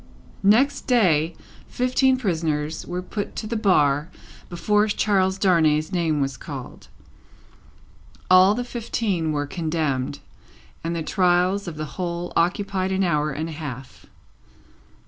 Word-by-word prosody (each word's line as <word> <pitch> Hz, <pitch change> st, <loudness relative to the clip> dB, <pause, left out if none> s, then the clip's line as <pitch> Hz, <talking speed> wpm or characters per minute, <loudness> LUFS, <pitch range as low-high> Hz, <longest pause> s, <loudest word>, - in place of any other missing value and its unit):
Next 230 Hz, +9 st, +3 dB
day, 170 Hz, -, +3 dB, 0.3 s
fifteen 255 Hz, +1 st, +2 dB
prisoners 160 Hz, -, -2 dB
were 180 Hz, +1 st, -4 dB
put 205 Hz, +2 st, -5 dB
to -, -, -4 dB
the 230 Hz, +2 st, -3 dB
bar 150 Hz, -8 st, +2 dB, 0.4 s
before 210 Hz, +4 st, +1 dB
Charles 195 Hz, -3 st, +1 dB
Darnay's 160 Hz, -5 st, +2 dB
name 165 Hz, -5 st, 0 dB
was 135 Hz, -1 st, -2 dB
called. 140 Hz, -5 st, -9 dB, 1.4 s
All 185 Hz, +2 st, +6 dB
the 245 Hz, -, -2 dB
fifteen 220 Hz, -8 st, -2 dB
were 145 Hz, -1 st, -1 dB
condemned, 150 Hz, -4 st, -2 dB, 0.7 s
and 170 Hz, +1 st, -2 dB
the 165 Hz, -, -2 dB
trials 180 Hz, +2 st, +1 dB
of 170 Hz, -, -5 dB
the 155 Hz, -, -3 dB, 0.2 s
whole 175 Hz, 0 st, -3 dB
occupied 190 Hz, +2 st, 0 dB
an 190 Hz, 0 st, +1 dB
hour 150 Hz, -4 st, +1 dB
and 155 Hz, +3 st, -4 dB
a -, -, -6 dB
half. 140 Hz, -4 st, -8 dB
175 Hz, 125 wpm, -23 LUFS, 155-200 Hz, 1.4 s, All